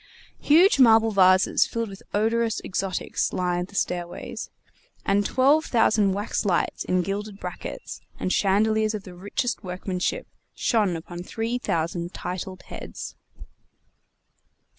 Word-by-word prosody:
Huge 330 +2 +5
marble 225 -3 +6
vases 185 -1 +4
filled 230 -2 -3
with 195 0 -10
odorous 225 +2 +1
exotics 190 0 -2
lined 180 0 -1
the 200 - -16
stairways, 175 -2 -3 0.6
and 200 +1 +3
twelve 280 +8 +3
thousand 215 -4 +3
wax 205 +2 -2
lights 185 -5 0
in 180 0 +1
gilded 200 +2 -4
brackets, - - -7 0.2
and 185 - 0
chandeliers 215 +2 +2
of 205 - -6
the 185 - -10
richest 205 +6 -3
workmanship, 180 0 -3 0.3
shone 210 -7 +1
upon 175 +2 -7
three 225 +6 -3
thousand 170 -3 -2
titled 185 +1 -5
heads. - - -8
200 Hz, 120 wpm, -25 LUFS, 180-225 Hz, 0.6 s, marble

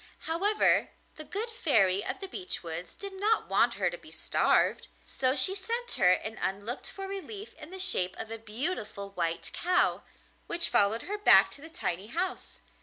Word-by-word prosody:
However, 395 +7 +1 0.3
the 310 - -7
good 430 +8 -5
Fairy 205 - +2
of - - -5
the 390 - -5
Beech 370 - -6
Woods 165 +1 -7
did 395 -1 -8
not 435 +2 +1
want - - +2
her - - 0
to - - -8
be - - -15
starved, - - +1 0.2
so 260 0 0
she 295 +8 +3
sent 465 +5 -3
her 180 - +3
an 215 +4 0
unlooked 200 +6 -4
for 390 0 -7
relief 395 +2 -8
in 305 -1 -13
the 380 - -9
shape 185 - -1
of 220 - -7
a 225 - -5
beautiful 215 - -5
white 170 -3 -3
cow, 360 +1 +1 0.5
which 340 0 +4
followed 205 +3 +5
her 415 +2 -5
back 415 - +8
to 280 - -8
the 320 - -11
tiny 205 - -3
house. 360 - -1
320 Hz, 180 wpm, -29 LUFS, -, 0.5 s, back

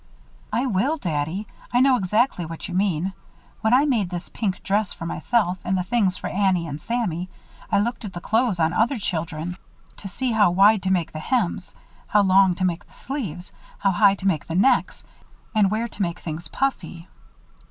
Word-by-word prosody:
"I 235 +5 0
will, 260 +7 +1
Daddy. 165 - -2 0.3
I 245 - +3
know 265 0 +5
exactly 210 -1 +1
what 165 +3 -6
you 180 - -7
mean. 185 -1 0 0.5
When 220 0 +1
I 260 +4 +5
made 230 -10 +1
this 175 -1 -6
pink 195 -5 -3
dress 205 0 0
for 165 - -8
myself 185 0 0
and 190 +1 0
the 180 - 0
things 195 -3 +1
for - - -8
Annie 190 -3 +1
and 145 0 -6
Sammy, 185 -7 -2 0.4
I - - +4
looked 230 +4 -1
at 200 -3 -6
the 175 - -5
clothes 220 0 +1
on 160 +1 +2
other 235 +8 +2
children 170 -3 -3 0.4
to 200 - -8
see 245 +6 -2
how 215 -4 +4
wide 200 +4 +5
to 190 - -1
make 175 -4 0
the 155 - -6
hems, 190 -2 -1 0.3
how 205 -1 +4
long 190 -1 +5
to 185 - -1
make 175 -2 -2
the - - -23
sleeves, 195 - -5 0.3
how 195 - +2
high 200 +1 +4
to 195 - -9
make 160 -6 0
the 165 - -4
necks, 200 +9 +2 0.5
and 210 -3 +4
where 220 +3 -1
to 210 - -7
make 170 -3 -1
things 160 0 -6
puffy." 175 - -3
190 Hz, 195 wpm, -23 LUFS, 175-220 Hz, 0.5 s, know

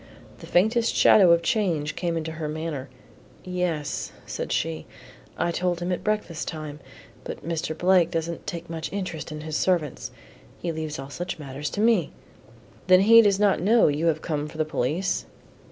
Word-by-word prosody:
The - - -11
faintest 225 +6 +2
shadow 190 -4 +6
of 170 0 +5
a - - -18
change 165 -6 0
came 170 -2 -1
into 160 0 -3
her 155 -1 -4
manner. 150 -4 -4 0.5
"Yes," 180 -5 -2
said - - -5
she, 80 -1 -2 0.5
"I 170 - 0
told 175 0 -1
him 175 +1 -2
at 180 - -2
breakfast 210 -7 -2
time; 155 -2 -6 0.4
but - - -7
Mr. 160 -1 -2
Blake 180 -1 +4
doesn't 170 -1 -4
take 170 0 -5
much 160 -1 -5
interest 185 -5 -4
in 150 0 -6
his 155 0 -5
servants; 170 -7 0 0.5
he 170 - -2
leaves 155 -1 -4
all 135 +1 -8
such 175 +4 -4
matters 145 0 -5
to 205 - -3
me." 220 -8 +3 0.7
"Then 185 0 +7
he 230 +3 +8
does 200 -3 +3
not 205 -4 +3
know 220 0 +5
you 150 +3 0
have 160 -1 0
come 150 -2 -2
for 155 - -11
the 155 - +1
police?" 155 +5 -1
165 Hz, 180 wpm, -25 LUFS, 155-185 Hz, 0.7 s, he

